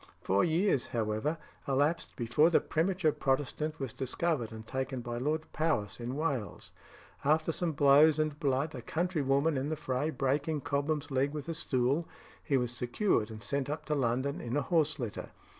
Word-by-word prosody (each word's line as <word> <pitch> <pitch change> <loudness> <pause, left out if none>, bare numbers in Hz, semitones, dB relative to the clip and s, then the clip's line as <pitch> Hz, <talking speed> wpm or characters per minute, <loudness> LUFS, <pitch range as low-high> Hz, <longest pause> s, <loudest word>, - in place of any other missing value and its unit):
Four 95 +1 +3
years, 165 -4 +2
however, 110 +7 -1 0.3
elapsed 145 +5 +1
before 125 +7 +3
the 170 - +5
premature 170 0 +1
Protestant 145 +3 -1
was 135 -5 -4
discovered 135 -2 -1
and 110 0 -9
taken 130 +1 -3
by 120 0 -4
Lord 155 +4 0
Powis 155 -12 0
in 120 +2 -4
Wales. 140 -8 -3 0.5
After 155 +3 +3
some 165 0 -1
blows 145 +2 +6
and 155 -1 -1
blood 140 +2 0
a 125 - -6
country 170 +5 -1
woman 140 +3 +2
in 135 +3 -1
the 155 - -1
fray 140 0 -1
breaking 145 +2 0
Cobham's 145 +2 -1
leg 135 +2 +1
with 150 -1 -5
a - - -1
stool, 140 +1 0 0.4
he 140 - +2
was 125 -1 -2
secured 120 - +1
and 110 -2 -8
sent 140 +3 -2
up 150 +2 -4
to 155 - -1
London 130 0 0
in 120 +4 -2
a 145 - +1
horse 155 0 +2
litter. 120 -7 -5
140 Hz, 175 wpm, -31 LUFS, 125-155 Hz, 0.5 s, blows